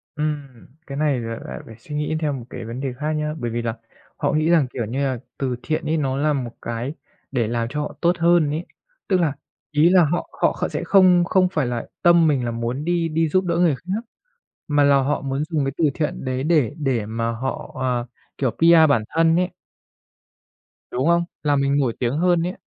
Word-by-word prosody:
Ừm, 145 Hz, -5 st, -4 dB, 0.2 s
cái 140 Hz, -, -6 dB
này 145 Hz, -3 st, +1 dB
lại 115 Hz, -1 st, -5 dB
lại -, -, -6 dB
phải 115 Hz, -, -11 dB
suy 150 Hz, +5 st, -8 dB
nghĩ 150 Hz, +1 st, -1 dB
theo 150 Hz, -2 st, 0 dB
một 125 Hz, -4 st, -6 dB
cái 120 Hz, -2 st, -7 dB
vấn 115 Hz, +3 st, -6 dB
đề 135 Hz, -2 st, -3 dB
khác 150 Hz, +5 st, -3 dB
nhá, 150 Hz, 0 st, -1 dB
bởi 120 Hz, -3 st, -3 dB
vì 120 Hz, +1 st, -2 dB
là 115 Hz, -1 st, -2 dB, 0.4 s
họ -, -, 0 dB
nghĩ 155 Hz, +2 st, +2 dB
rằng, 165 Hz, -6 st, +4 dB
kiểu 120 Hz, -, -2 dB
như 120 Hz, +6 st, -3 dB
là, 130 Hz, -3 st, -1 dB, 0.2 s
từ 130 Hz, -2 st, -1 dB
thiện 155 Hz, 0 st, -2 dB
ấy 160 Hz, +2 st, +1 dB
nó 135 Hz, -3 st, -1 dB
là 150 Hz, +2 st, +2 dB
một 125 Hz, -4 st, -3 dB
cái 115 Hz, +4 st, -4 dB, 0.4 s
để 120 Hz, -5 st, 0 dB
làm 115 Hz, 0 st, -1 dB
cho 150 Hz, +3 st, -3 dB
họ 150 Hz, -, -4 dB
tốt 175 Hz, 0 st, +2 dB
hơn 170 Hz, -3 st, +4 dB
ấy. 160 Hz, +4 st, -3 dB, 0.4 s
Tức 190 Hz, -, +3 dB
là, 160 Hz, -5 st, +1 dB, 0.4 s
ý 150 Hz, +3 st, +4 dB
là 180 Hz, -2 st, +6 dB
họ 175 Hz, +4 st, -2 dB
họ -, -, +4 dB
kh -, -, -14 dB
họ -, -, +2 dB
sẽ -, -, -3 dB
không 185 Hz, -3 st, +5 dB
không 185 Hz, +1 st, +3 dB
phải 155 Hz, -7 st, 0 dB
là 120 Hz, -1 st, -3 dB
tâm 170 Hz, -2 st, +5 dB
mình 135 Hz, -5 st, +1 dB
là 120 Hz, -, -1 dB
muốn 120 Hz, +5 st, -3 dB
đi 175 Hz, -1 st, +1 dB
đi 160 Hz, 0 st, +1 dB
giúp 185 Hz, +4 st, +2 dB
đỡ 170 Hz, -1 st, 0 dB
người 170 Hz, -4 st, +3 dB
khác 185 Hz, -, -4 dB, 0.7 s
mà 145 Hz, -1 st, +3 dB
là 140 Hz, 0 st, +5 dB
họ 145 Hz, +2 st, 0 dB
muốn 135 Hz, +1 st, -2 dB
dùng 155 Hz, -4 st, +1 dB
cái 135 Hz, -, -1 dB
từ 165 Hz, -, +1 dB
thiện 150 Hz, -3 st, -3 dB
đấy 130 Hz, 0 st, -2 dB
để 150 Hz, -6 st, +2 dB
để 130 Hz, -8 st, 0 dB
mà 115 Hz, +1 st, -2 dB
họ, 125 Hz, +3 st, -4 dB
ờ, 125 Hz, -2 st, 0 dB, 0.3 s
kiểu, 130 Hz, -3 st, +1 dB
PR 165 Hz, +3 st, +6 dB
bản 115 Hz, -6 st, +2 dB
thân 165 Hz, 0 st, +4 dB
ấy. 180 Hz, +1 st, +1 dB, 1.4 s
Đúng 130 Hz, +4 st, 0 dB
không? 170 Hz, 0 st, +4 dB, 0.2 s
Làm 145 Hz, -2 st, +2 dB
mình 140 Hz, +1 st, +2 dB
nổi 130 Hz, -5 st, +1 dB
tiếng 125 Hz, +3 st, 0 dB
hơn 175 Hz, 0 st, +3 dB
ấy. 180 Hz, -, -3 dB
145 Hz, 235 wpm, -22 LUFS, 125-165 Hz, 1.4 s, là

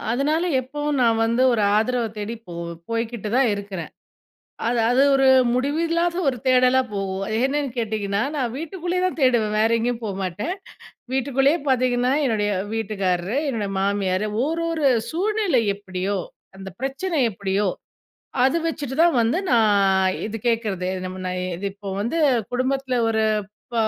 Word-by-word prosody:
அதனால 290 Hz, +7 st, +1 dB, 0.2 s
எப்பவும் 290 Hz, +2 st, -3 dB
நான் 230 Hz, -1 st, +3 dB
வந்து 235 Hz, +3 st, +1 dB
ஒரு 225 Hz, -3 st, +1 dB
ஆதரவ 240 Hz, +3 st, +1 dB, 0.2 s
தேடிப் 225 Hz, +2 st, -6 dB
போ -, -, -7 dB, 0.4 s
போய்கிட்டுதான் 230 Hz, +2 st, 0 dB
இருக்கிறேன். 195 Hz, -5 st, -6 dB, 0.8 s
அது 240 Hz, 0 st, +1 dB
அது 255 Hz, +3 st, +4 dB
ஒரு 270 Hz, 0 st, +4 dB, 0.3 s
முடிவில்லாத 330 Hz, +6 st, 0 dB
ஒரு 255 Hz, -, -4 dB
தேடலாப் 255 Hz, -1 st, +4 dB
போகும். 195 Hz, -1 st, -3 dB, 0.2 s
என்னன்னு 280 Hz, 0 st, -1 dB
கேட்டீங்கன்னா, 210 Hz, -3 st, -1 dB
நான் 250 Hz, -5 st, -1 dB
வீட்டுக்குள்ளேயேதான் 355 Hz, +2 st, -2 dB
தேடுவேன். 225 Hz, -5 st, +2 dB
வேற 220 Hz, +1 st, +3 dB
எங்கேயும் 240 Hz, 0 st, -2 dB
போமாட்டேன். 195 Hz, -, -3 dB, 0.6 s
வீட்டுக்குள்ளேயே 270 Hz, +4 st, +2 dB
பாத்தீங்கன்னா, 250 Hz, -1 st, +2 dB
என்னுடைய 210 Hz, -4 st, 0 dB, 0.2 s
வீட்டுக்காரரு, 195 Hz, -1 st, -1 dB
என்னுடைய 215 Hz, -6 st, -2 dB
மாமியாரு, 195 Hz, 0 st, 0 dB, 0.2 s
ஓரொரு 330 Hz, -1 st, -1 dB, 0.2 s
சூழ்நிலை 395 Hz, -, +1 dB
எப்டியோ, 195 Hz, 0 st, -3 dB, 0.4 s
அந்த 195 Hz, 0 st, -7 dB
பிரச்சனை 275 Hz, +6 st, -2 dB
எப்டியோ 195 Hz, +1 st, -1 dB, 0.7 s
அத 270 Hz, +6 st, +3 dB
வச்சுட்டுதான் 320 Hz, +1 st, +1 dB
வந்து 230 Hz, +10 st, +2 dB
நான் 200 Hz, -5 st, +3 dB
இது 220 Hz, +1 st, -5 dB
கேக்குறது. 215 Hz, -6 st, 0 dB, 0.4 s
நா -, -, -1 dB, 0.4 s
இப்போ 200 Hz, 0 st, -10 dB
வந்து 235 Hz, +10 st, -2 dB, 0.4 s
குடும்பத்துல 260 Hz, +1 st, -1 dB
ஒரு 220 Hz, -1 st, +1 dB, 0.5 s
ப -, -, -6 dB
240 Hz, 125 wpm, -23 LUFS, 205-275 Hz, 0.8 s, அது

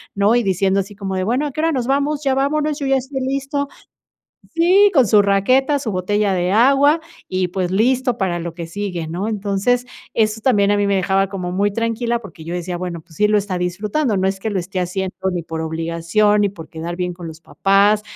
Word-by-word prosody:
¿no? 200 Hz, +3 st, +3 dB
Y 240 Hz, -, +2 dB
diciendo 195 Hz, 0 st, +1 dB
así 200 Hz, +2 st, -9 dB
como 195 Hz, -1 st, -4 dB
de: 185 Hz, -, -1 dB
"Bueno, 245 Hz, +9 st, 0 dB
¿a -, -, -5 dB
qué 310 Hz, -, -3 dB
hora 325 Hz, +1 st, +2 dB
nos 255 Hz, -5 st, -1 dB
vamos? 285 Hz, +2 st, 0 dB
Ya 270 Hz, -2 st, +1 dB
vámonos, 295 Hz, +2 st, 0 dB
yo 280 Hz, -, -3 dB
ya 270 Hz, 0 st, +3 dB
estoy 265 Hz, +1 st, -4 dB
listo". 275 Hz, +2 st, -2 dB, 0.9 s
Sí, 370 Hz, +5 st, +5 dB
con 265 Hz, -6 st, +5 dB
su 210 Hz, +1 st, +5 dB
raqueta, 255 Hz, +9 st, +2 dB
su 255 Hz, -5 st, -4 dB
botella 200 Hz, +2 st, 0 dB
de 180 Hz, 0 st, 0 dB
agua, 275 Hz, +7 st, +4 dB, 0.3 s
y 185 Hz, -1 st, -1 dB
pues 180 Hz, 0 st, -2 dB
listo 250 Hz, +5 st, +1 dB
para 180 Hz, -3 st, 0 dB
lo 170 Hz, -1 st, -5 dB
que 170 Hz, -1 st, -6 dB
sigue, 180 Hz, -2 st, -4 dB
¿no? 180 Hz, +6 st, -3 dB
Entonces, 210 Hz, +3 st, 0 dB, 0.3 s
eso 215 Hz, 0 st, +1 dB
también 205 Hz, -5 st, +3 dB
a 205 Hz, -, +3 dB
mí 205 Hz, -, +1 dB
me 200 Hz, -1 st, +2 dB
dejaba 195 Hz, +1 st, +1 dB
como 180 Hz, -2 st, -4 dB
muy 200 Hz, +2 st, +1 dB
tranquila 230 Hz, +2 st, -1 dB
porque 195 Hz, -7 st, -12 dB
yo 170 Hz, +2 st, -5 dB
decía: 180 Hz, 0 st, -3 dB
"Bueno, 175 Hz, -2 st, -5 dB
pues 160 Hz, -1 st, -19 dB
sí 210 Hz, -, +3 dB
lo 210 Hz, -, +3 dB
está 195 Hz, -3 st, -3 dB
disfrutando, 205 Hz, -, -1 dB
no 190 Hz, 0 st, +1 dB
es 190 Hz, 0 st, -2 dB
que 220 Hz, -, -3 dB
lo 200 Hz, -, -1 dB
esté 185 Hz, +1 st, -3 dB
haciendo, 185 Hz, +1 st, -3 dB, 0.2 s
ni 175 Hz, -1 st, -3 dB
por 160 Hz, 0 st, -5 dB
obligación, 165 Hz, +6 st, +1 dB
ni 205 Hz, -, +3 dB
por 165 Hz, -5 st, -11 dB
quedar 170 Hz, +1 st, -5 dB
bien 180 Hz, 0 st, -2 dB
con 175 Hz, -1 st, -9 dB
los 160 Hz, 0 st, -9 dB
papás, 200 Hz, +4 st, +2 dB
200 Hz, 230 wpm, -19 LUFS, 180-250 Hz, 0.9 s, Sí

